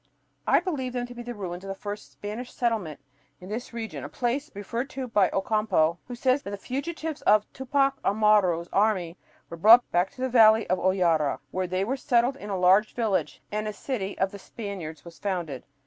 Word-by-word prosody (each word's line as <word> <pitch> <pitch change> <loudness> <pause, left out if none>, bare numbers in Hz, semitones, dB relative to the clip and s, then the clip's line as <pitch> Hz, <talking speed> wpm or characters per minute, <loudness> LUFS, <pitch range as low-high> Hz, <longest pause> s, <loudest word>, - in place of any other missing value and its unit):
I - - +5
believe 285 -9 -3
them 245 -1 -2
to 245 - -10
be 240 - -8
the 240 0 -6
ruins 180 -3 -6
of - - -8
the 195 - -4
first 205 +1 -7
Spanish 220 +5 -6
settlement 220 - -1 0.4
in 185 - -11
this 230 +4 -5
region, 230 -2 -6
a - - -6
place 260 +5 -2
referred 230 +6 -4
to 265 -1 -5
by 205 -5 +3
Ocampo, 195 -5 +1
who 245 - -6
says 255 +3 +2
that - - -7
the 200 - -4
fugitives 305 - -4
of 210 0 +4
Tupac 270 +1 +1
Amaru's 200 -5 +3
army 195 -5 +1 0.3
were 170 - -8
"brought 225 +7 +7
back 175 +2 +2
to 255 - -11
the 260 - +1
valley 225 -3 +6
of 185 - +2
Hoyara," 170 -6 +2
where 185 0 -1
they 185 +2 -1
were 260 +7 -1
"settled 250 -1 +2
in 210 - -8
a 195 - -1
large 190 +4 +4
village, 220 -5 -1
and 215 +1 -2
a 215 - -3
city 205 -4 -4
of 190 +1 0
Spaniards 190 -10 -7
was 170 -1 -12
founded 175 -9 -3
210 Hz, 200 wpm, -26 LUFS, 185-245 Hz, 0.4 s, brought